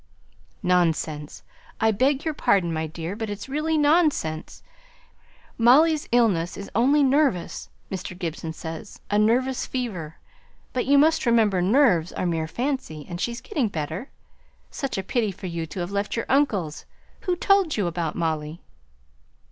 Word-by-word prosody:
"Nonsense! 160 -4 0 0.4
I 220 0 +3
beg 265 +7 +1
your 315 - 0
pardon, 190 - +2
my 160 0 -2
dear, 165 +4 -5
but 220 0 -4
it's 205 +3 -6
really 305 +3 0
nonsense. 295 - +1 1.0
Molly's 295 +7 +5
illness 205 -9 +2
is 200 - -8
only 275 +7 +4
nervous, 270 - +1 0.2
Mr. 185 -1 -5
Gibson 165 -2 -4
says. 160 +4 -8
A 205 - +3
nervous 250 +4 +1
fever; 185 -12 -4 0.6
but 255 -1 -1
you 280 +1 +5
must 315 -1 +3
remember 220 -6 +3
nerves 190 - +3
are - - -2
mere 165 -2 -1
fancy, 240 - -3
and 175 0 -6
she's 235 0 -2
getting 290 - -1
better. 160 - -4 0.6
Such 275 -6 -3
a 190 - -2
pity 220 +1 0
for 190 +1 -10
you 170 -2 -3
to 180 +4 -5
have 175 +2 -4
left 200 +1 -2
your 230 - -2
uncle's. 210 - 0 0.4
Who 360 - +2
told 390 - +2
you 205 - +1
about 170 -2 -2
Molly?" 160 -1 -2
205 Hz, 150 wpm, -24 LUFS, 170-265 Hz, 1.0 s, Molly's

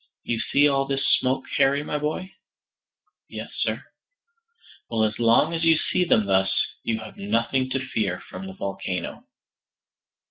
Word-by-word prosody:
"You 115 - -1
see 145 +5 +3
all 135 -1 +2
this 135 0 0
smoke, 130 +1 +2
Harry, 140 +2 +3
my 150 0 -2
boy?" 155 +6 -3 1.0
"Yes, - - -7
sir." - - -1 1.1
"Well, 115 -2 +1
as 110 +1 0
long 115 +7 +4
as 165 0 -1
you 165 -1 +5
see 180 +3 +1
them 110 -11 +3
thus, 95 -1 +2 0.3
you 115 - -1
have 110 - -10
nothing 115 +6 0
to 130 0 -2
fear 100 -7 -1
from 95 +1 -7
the 95 - -7
volcano." 95 -2 -4
120 Hz, 150 wpm, -25 LUFS, 105-140 Hz, 1.1 s, you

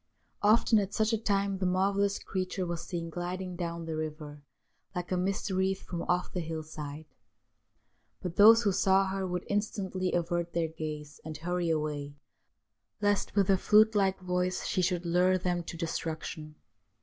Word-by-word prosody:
Often 220 +1 +5
at 200 0 -3
such 220 +1 +2
a - - +3
time 200 -2 0
the 190 - 0
mar 190 +2 +2
vellous 200 0 +1
creature 185 0 -2
was 170 -1 -4
seen 170 -2 -4
gliding 180 +2 -4
down 170 -1 -4
the 160 -1 -3
river 155 -1 -5 0.5
like 180 0 -4
a - - +2
mist 190 +3 -1
wreath 190 +1 0
from 175 -2 -5
off 180 0 0
the 180 - -1
hill 160 -1 -4
side. 155 0 -7 1.1
But 180 -2 -5
those 225 +3 +8
who 205 - +3
saw 195 0 +3
her 190 0 -2
would 180 0 -3
instantly 195 -3 -1
avert 170 0 -1
their 165 -1 0
gaze 155 -2 -6
and 155 -1 -6
hurry 175 +1 -1
away, 150 -2 -2 0.8
lest, 205 -1 0
with 200 -2 +3
her 195 - +4
flute 215 +3 +5
like 195 -2 +2
voice, 180 0 -1
she 185 - 0
should 180 -1 0
lure 180 +2 +3
them 180 -1 -1
to 170 - -6
destruction. 160 -2 -4
180 Hz, 175 wpm, -30 LUFS, 165-195 Hz, 1.1 s, those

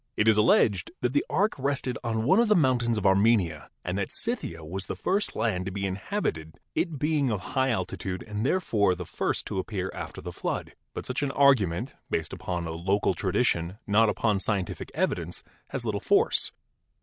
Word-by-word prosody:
It 105 - +3
is 110 - +7
alleged 105 -3 +3
that 125 0 0
the 145 - +3
ark 205 +3 +2
rested 135 -2 -1
on 110 -2 -1
one 185 - +5
of 235 - +4
the 210 - +5
mountains 125 -7 +2
of 105 - -2
Armenia 95 - +3 0.2
and 90 +2 -1
that 100 - -2
Scythia 85 - -3
was 95 +4 -5
the - - -3
first 200 +3 -1
land 95 -5 0
to - - -2
be 100 +1 -3
inhabited, 95 - -3
it 165 -5 -1
being 150 -1 +1
of 105 -4 -1
high 130 -1 +2
altitude 95 -3 -2
and 105 -1 -4
therefore 110 - +2
the 90 0 -6
first - - -2
to - - -3
appear 95 -1 -3
after - - -6
the - - -7
flood. - - -3 0.2
But - - -5
such 130 +2 -2
an 145 - 0
argument, 130 -12 +3 0.2
based - - -2
upon 85 -2 -3
a 80 - -4
local 95 +5 +1
tradition, 85 +3 0
not 110 +2 +4
upon 105 -1 +1
scientific 95 -3 -2
evidence, - - -1 0.2
has - - -4
little - - -1
force. - - +2
105 Hz, 190 wpm, -27 LUFS, 95-130 Hz, 0.2 s, is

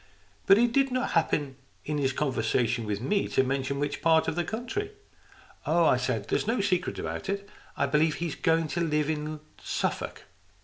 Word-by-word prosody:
" - - -34
But 195 - +8
he 240 +2 +5
did 270 +3 +2
not 255 0 -1
happen 145 -5 0 0.3
in 150 0 -1
his 135 -2 +1
conversation 120 -4 0
with 105 -1 -1
me 200 +10 +1
to 130 - +2
mention 135 +1 -1
what 145 0 -2
part 160 -1 +4
of - - 0
the 175 - 0
country." 250 - -4 0.7
"Oh," 170 +1 +4
I 130 - +5
said, 125 -4 -2
"there's - - 0
no 235 +2 +1
secret 185 -3 0
about 195 - -4
it, 200 0 -2 0.3
I 140 - +2
believe. 150 +2 +2
He's 170 -3 -3
going 165 0 +1
to 170 - -1
live 150 -2 +1
in 155 0 -4 0.2
Suffolk." - - -3
155 Hz, 190 wpm, -28 LUFS, 135-195 Hz, 0.7 s, But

